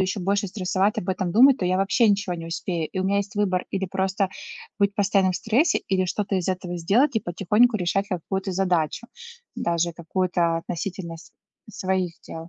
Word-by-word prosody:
еще 190 +1 -1
больше 200 +3 0
стрессовать, 190 +1 0
об 175 - -2
этом 185 -1 -2
думать, 260 +5 +6
то 180 - -1
я 185 +1 +2
вообще 195 +4 +3
ничего 200 -2 +1
не 165 -1 -7
успею. 165 -1 -3
И - - -4
у 185 - 0
меня 200 +1 +2
есть 200 -1 -4
выбор: 185 -3 0
или 195 -1 -1
просто 190 +1 -1 0.5
быть 200 -1 +2
постоянно 195 -2 +2
в - - -2
стрессе 245 +10 +2
или 185 -1 +1
что-то 200 +1 -1
из 185 -1 -2
этого 180 -1 -3
сделать 230 - +2
и - - +2
потихоньку 210 +7 +2
решать 195 +1 0
какую-то 190 +2 -3
задачу, 180 +2 0 0.5
даже 170 0 0
какую-то 170 0 0
относительно 170 0 -5
с 165 - -15 0.4
своих 185 -3 -1
дел. 165 +1 -8
190 Hz, 190 wpm, -24 LUFS, 175-200 Hz, 0.5 s, думать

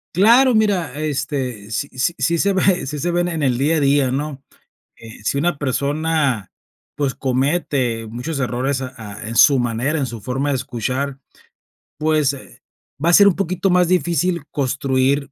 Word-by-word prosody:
Claro, 240 +6 +5
mira, 190 - +1
este, 130 -7 -3
sí 140 +6 -2
sí 130 +7 +1
sí 170 0 +1
se 200 +4 +2
ve, 190 -1 +2
sí 145 +2 -5
se 175 +3 -1
ven 175 0 0
en 160 -4 -3
el 125 -3 +1
día 150 +5 +1
a - - +2
día, 140 -2 +2
¿no? 140 0 -4 0.5
Eh, 115 -2 -13
si 125 - -1
una 160 +1 0
persona, 140 - -1 0.5
pues, 140 -2 -1
comete 130 -3 -1
muchos 125 +6 -5
errores, 130 +2 -1
ah 130 0 -6
ah, 105 -3 -9
en 115 - -5
su 140 -3 +6
manera, 120 +6 -1
en 135 - -1
su 115 -3 -8
forma 135 +4 -2
de 140 - +1
escuchar, 130 +3 -3 0.8
pues, 155 -2 +2
eh, 140 - -12 0.4
va 170 - +3
a - - +3
ser 200 +3 +8
un 185 - +3
poquito 185 0 -1
más 180 -1 +3
difícil 175 -2 0
construir 135 0 0
140 Hz, 175 wpm, -20 LUFS, 130-165 Hz, 0.8 s, ser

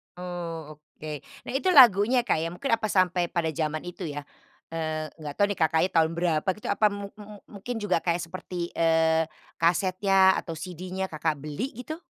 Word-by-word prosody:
Oh, 165 -4 -6
oke. 150 0 -9 0.3
Nah, - - -6
itu 370 - -2
lagunya 240 -1 +7
Kak - - +1
ya, 165 - -1
mungkin 270 +8 -3
apa 225 -1 +2
sampai 180 -3 +2
pada 165 -3 -1
jaman 155 0 -2
itu 180 0 -6
ya, 145 0 -5 0.5
eee, 155 -1 -3
nggak 150 -2 -6
tahu 205 - +4
nih - - -4
Kakaknya 160 +3 +3
tahun 160 -1 +3
berapa 170 -1 0
gitu 210 - -9
apa 215 - +2
mu 200 0 -5
mu 210 0 -10
mungkin 210 +4 -6
juga 185 -5 +1
kayak 170 0 0
seperti, 180 -1 -5
eee, 160 -1 +3 0.3
kasetnya 190 +3 +4
atau 165 -2 -6
CD-nya 185 +3 -5
Kakak 155 -1 -1
beli 155 - -4
gitu? 315 +4 -6
175 Hz, 180 wpm, -27 LUFS, 160-195 Hz, 0.5 s, lagunya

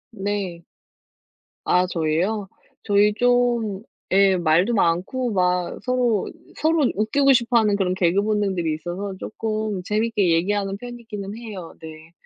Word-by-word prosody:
네. 195 -4 -3 1.0
아 180 0 +3
저희요? 180 +5 -1 0.3
저희 205 +1 +3
좀 240 -4 +1 0.3
예, 195 0 +5
말도 175 +7 +2
많고 200 +7 0
막 180 -2 0
서로, 245 -5 0 0.3
서로 320 0 +2
웃기고 275 +7 +3
싶어하는 230 -4 +2
그런 185 -2 0
개그 185 +1 +2
본능들이 195 -6 0
있어서 180 +5 -5
쪼끔 215 -1 -3
재밌게 210 -2 +1
얘기하는 195 +3 0
편이기는 220 -4 -8
해요 205 -7 -8
네. 160 0 -11
200 Hz, 255 characters per minute, -22 LUFS, 180-225 Hz, 1.0 s, 예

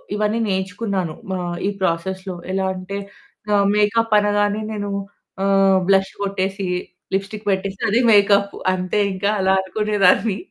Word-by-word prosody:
ఇవన్నీ 210 +2 0
నేర్చుకున్నాను 190 -2 -2 0.2
ఆహ్, 175 -1 -4
ఈ - - +2
ప్రాసెస్‌లో 185 +2 -2 0.2
ఎలా 190 0 0
అంటే 185 +2 -6 0.6
ఆహ్, 200 -1 +3
మేకప్ 215 +2 +2
అనగానే 205 0 +1
నేను 205 -1 -4 0.5
ఆహ్, 195 -1 +4
బ్లష్ 195 0 +3
కొట్టేసి 195 0 -2 0.5
లిప్‌స్టిక్ 200 +2 -4
పెట్టేస్తే 195 0 -2
అదే 230 - +3
మేకప్ 200 -1 +4 0.2
అంతే 185 +2 -1
ఇంకా 190 +2 -1
అలా 190 0 +3
అనుకునేదాన్ని. 205 +1 +2
195 Hz, 125 wpm, -20 LUFS, 190-205 Hz, 0.6 s, ఆహ్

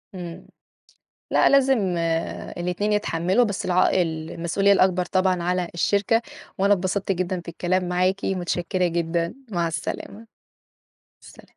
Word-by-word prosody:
إمم، 175 -2 -8 0.8
لأ - - +4
لازم 270 -2 +4 0.8
الاتنين 180 +4 -1
يتحملوا 190 +2 +1
بس 200 -3 -3
العائ 185 0 +3
المسؤولية 165 +4 0
الأكبر 185 -2 +3
طبعًا 185 -2 +1
على 180 0 0
الشركة، 205 +6 +2 0.4
وأنا 200 +1 +4
اتبسطت 195 +1 -1
جدًا 185 0 -2
في 170 - -16
الكلام 180 +1 -1
معاكِ، 185 +2 0
متشكرة 180 -1 -1
جدًا، 170 +1 -1 0.2
مع 170 -3 0
السلامة. 205 +6 -5 0.9
سلام. - - -16
185 Hz, 120 wpm, -23 LUFS, 175-195 Hz, 0.9 s, لأ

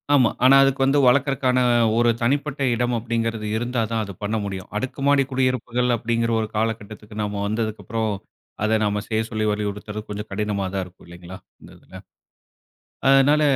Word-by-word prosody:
ஆமா. 125 -5 +5
ஆனா 130 +2 +7
அதுக்கு 135 0 +1
வந்து 135 +2 +3
வளர்க்கதற்கான 130 0 +3 0.4
ஒரு 120 0 +4
தனிப்பட்ட 140 +4 0
இடம் 120 +1 0
அப்டின்கிறது 115 -1 -2
இருந்தா 120 +1 -1
தான் 115 -1 0
அது 100 -1 -7
பண்ண 105 +2 -1
முடியும். 95 -2 -5
அடுக்குமாடி 135 +3 +1
குடியிருப்புகள் 125 -1 0
அப்டின்கிற 115 0 -1
ஒரு 110 - -2
காலகட்டத்துக்கு 110 -1 -4
நாம 105 -1 -3
வந்ததுக்கப்புறம், 110 0 -2 0.5
அத 110 +1 +2
நாம 105 0 0
செய்ய 110 -1 0
சொல்லி 110 -1 -2
வலியுறுத்றது 105 0 -4
கொஞ்சம் 105 +1 -6
கடினமா 100 -1 -2
தான் 95 -1 -1
இருக்கும் 90 +1 -17
இல்லைங்களா? 85 +2 -10 0.2
இந்த - - -14
இதுல. - - -14 1.1
அதனால 135 +3 +5
115 Hz, 150 wpm, -22 LUFS, 105-130 Hz, 1.1 s, ஆனா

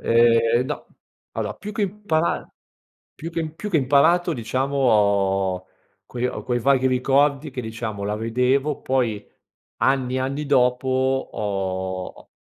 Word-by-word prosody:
Ehm, 115 +1 +4
no. 150 - -5 0.5
Allora 105 -1 -3
più 210 - -7
che 215 -1 -2
impara 185 -5 -1 0.7
più 165 - -7
che 165 -2 -2
più 205 +7 -7
che 170 - +2
imparato, 160 +6 +3
diciamo 130 +3 -2
ho 100 -6 +2 0.4
quei 125 0 -3
ho - - -5
quei 120 -1 -1
vaghi 130 +1 +3
ricordi 140 +3 +2
che 130 -1 -5
diciamo 110 -3 -5
la 105 +1 -2
vedevo, 125 +6 0
poi 120 -6 -1 0.5
anni 130 -1 +1
e - - +1
anni 140 +3 -2
dopo 125 -1 +2 0.4
ho 95 -2 -3
ho - - -17
125 Hz, 140 wpm, -23 LUFS, 110-140 Hz, 0.7 s, Ehm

